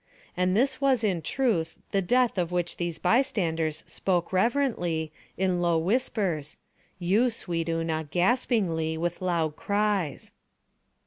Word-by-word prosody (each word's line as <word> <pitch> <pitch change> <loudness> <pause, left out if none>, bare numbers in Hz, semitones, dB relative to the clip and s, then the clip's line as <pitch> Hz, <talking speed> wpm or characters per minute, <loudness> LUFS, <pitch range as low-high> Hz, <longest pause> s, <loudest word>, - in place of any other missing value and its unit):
And 180 +1 +1
this 265 +3 +1
was 265 -4 +3
in 185 -6 +1
truth 170 - 0
the 195 - +2
Death 245 +2 +2
of 175 -1 -1
which 175 -1 -1
these 175 -2 -3
bystanders 165 - +1
spoke 180 -2 -1
reverently, 185 - +1 0.3
in 185 -1 +1
low 170 -1 +2
whispers—you, 190 - -1
sweet 170 -7 -3
Una, 165 -1 -1
gaspingly, 175 - +1
with 175 +2 -2
loud 165 -4 0
cries. 200 -6 -1
180 Hz, 120 wpm, -27 LUFS, 165-220 Hz, 0.3 s, was